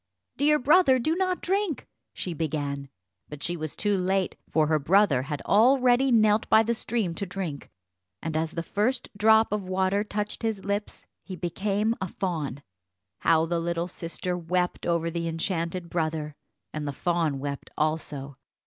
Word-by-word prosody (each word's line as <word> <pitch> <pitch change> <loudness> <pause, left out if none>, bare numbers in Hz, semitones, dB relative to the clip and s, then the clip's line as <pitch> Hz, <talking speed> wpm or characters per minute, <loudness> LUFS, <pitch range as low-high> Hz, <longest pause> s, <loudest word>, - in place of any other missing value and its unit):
"Dear 300 +2 +4
brother, 295 0 +5
do 310 +7 0
not 370 0 -1
drink," 385 - -1 0.2
she 180 - -4
began; 145 -3 -3 0.4
but 150 -1 -8
she 175 - -1
was 155 -3 -5
too 205 -1 +1
late, 190 +1 0
for 155 -1 +3
her 155 0 +2
brother 170 -2 +4
had 145 +2 -5
already 250 +3 +4
knelt 215 -2 +4
by 220 0 +6
the 235 +1 0
stream 220 -5 -1
to 200 - -4
drink, 180 -6 -5 0.5
and 160 -1 -4
as 160 +1 -1
the 165 - -3
first 240 +8 -1
drop 220 +2 +5
of 205 -3 -2
water 190 +2 +1
touched 210 0 -4
his 220 -4 -2
lips 200 +1 -3 0.2
he 190 - -8
became 200 +5 0
a 190 - -1
fawn. 155 -7 -3 0.6
How 160 0 +3
the 170 +1 -1
little 170 0 -1
sister 180 +1 -4
wept 180 +1 -1
over 170 -1 +1
the 170 0 -2
enchanted 170 +1 -2
brother, 155 -3 -2 0.4
and 150 -1 -3
the 140 - -3
fawn 165 -2 0
wept 140 +1 -5
also. 145 -3 -2
180 Hz, 165 wpm, -27 LUFS, 160-215 Hz, 0.6 s, by